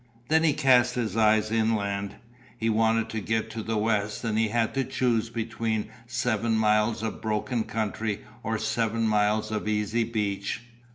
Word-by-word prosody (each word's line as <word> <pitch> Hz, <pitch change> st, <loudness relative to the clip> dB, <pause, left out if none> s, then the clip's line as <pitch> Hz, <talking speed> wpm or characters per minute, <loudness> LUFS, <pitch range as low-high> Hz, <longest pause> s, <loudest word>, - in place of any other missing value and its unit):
Then 160 Hz, +1 st, +4 dB
he 155 Hz, -3 st, +4 dB
cast 125 Hz, -2 st, +4 dB
his 115 Hz, -5 st, -2 dB
eyes 110 Hz, -1 st, +3 dB
inland. 100 Hz, -3 st, 0 dB, 0.4 s
He 115 Hz, -1 st, 0 dB
wanted 110 Hz, +1 st, +2 dB
to 110 Hz, -1 st, -3 dB
get 110 Hz, +2 st, -1 dB
to 115 Hz, -, -4 dB
the 110 Hz, 0 st, -2 dB
west 105 Hz, 0 st, 0 dB
and 110 Hz, -2 st, -1 dB
he 110 Hz, 0 st, +2 dB
had 115 Hz, +1 st, 0 dB
to 135 Hz, -, +1 dB
choose 115 Hz, -3 st, 0 dB
between 110 Hz, -1 st, -2 dB, 0.2 s
seven 115 Hz, -2 st, 0 dB
miles 110 Hz, +1 st, +2 dB
of 110 Hz, -, -4 dB
broken 110 Hz, +2 st, -1 dB
country 110 Hz, -1 st, -2 dB, 0.2 s
or 110 Hz, -2 st, -1 dB
seven 115 Hz, +1 st, 0 dB
miles 105 Hz, 0 st, +1 dB
of 105 Hz, 0 st, -2 dB
easy 105 Hz, +2 st, +1 dB
beach. 105 Hz, -2 st, -2 dB
110 Hz, 165 wpm, -27 LUFS, 105-115 Hz, 0.4 s, Then